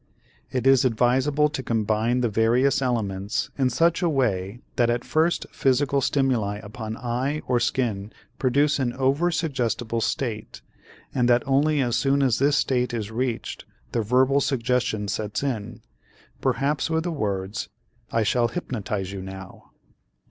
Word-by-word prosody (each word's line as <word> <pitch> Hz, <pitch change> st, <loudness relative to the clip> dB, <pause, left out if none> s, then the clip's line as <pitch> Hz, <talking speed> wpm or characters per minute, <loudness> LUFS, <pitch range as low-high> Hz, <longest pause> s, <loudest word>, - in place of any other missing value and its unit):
It 125 Hz, -1 st, -2 dB
is 135 Hz, -1 st, +6 dB
advisable 130 Hz, +5 st, +2 dB
to 145 Hz, -3 st, -4 dB
combine 115 Hz, +1 st, 0 dB
the 120 Hz, -, +2 dB
various 120 Hz, +6 st, +2 dB
elements 110 Hz, -3 st, -1 dB
in 130 Hz, -2 st, +2 dB
such 165 Hz, +7 st, +2 dB
a 175 Hz, -, +2 dB
way 115 Hz, -, -1 dB
that 120 Hz, -1 st, +2 dB
at 120 Hz, 0 st, -1 dB
first 160 Hz, +2 st, +1 dB
physical 140 Hz, +1 st, +1 dB
stimuli 125 Hz, -7 st, +1 dB
upon 110 Hz, +1 st, -6 dB
eye 130 Hz, +5 st, -2 dB
or 125 Hz, -1 st, +2 dB
skin 115 Hz, -4 st, -1 dB, 0.3 s
produce 140 Hz, +3 st, +2 dB
an 120 Hz, -3 st, 0 dB
over 135 Hz, +6 st, +1 dB
suggestible 125 Hz, -8 st, -1 dB
state 115 Hz, -5 st, -3 dB, 0.5 s
and 125 Hz, -1 st, +2 dB
that 120 Hz, 0 st, +4 dB
only 145 Hz, +2 st, +2 dB
as 120 Hz, -2 st, +1 dB
soon 140 Hz, 0 st, +2 dB
as 130 Hz, -4 st, +2 dB
this 140 Hz, +1 st, +3 dB
state 125 Hz, -2 st, +1 dB
is 110 Hz, -2 st, -4 dB
reached 120 Hz, 0 st, -3 dB, 0.3 s
the 115 Hz, -, 0 dB
verbal 130 Hz, +5 st, +3 dB
suggestion 125 Hz, -5 st, 0 dB
sets 105 Hz, +4 st, -3 dB
in, 120 Hz, -7 st, -3 dB, 0.6 s
perhaps 145 Hz, +3 st, 0 dB
with 160 Hz, 0 st, 0 dB
the 175 Hz, -, -2 dB
words, 100 Hz, -, -3 dB, 0.4 s
"I 115 Hz, -, +2 dB
shall 120 Hz, +3 st, +2 dB
hypnotize 105 Hz, -, -4 dB
you 100 Hz, -1 st, -6 dB
now." 95 Hz, 0 st, -10 dB
125 Hz, 150 wpm, -24 LUFS, 110-135 Hz, 0.6 s, is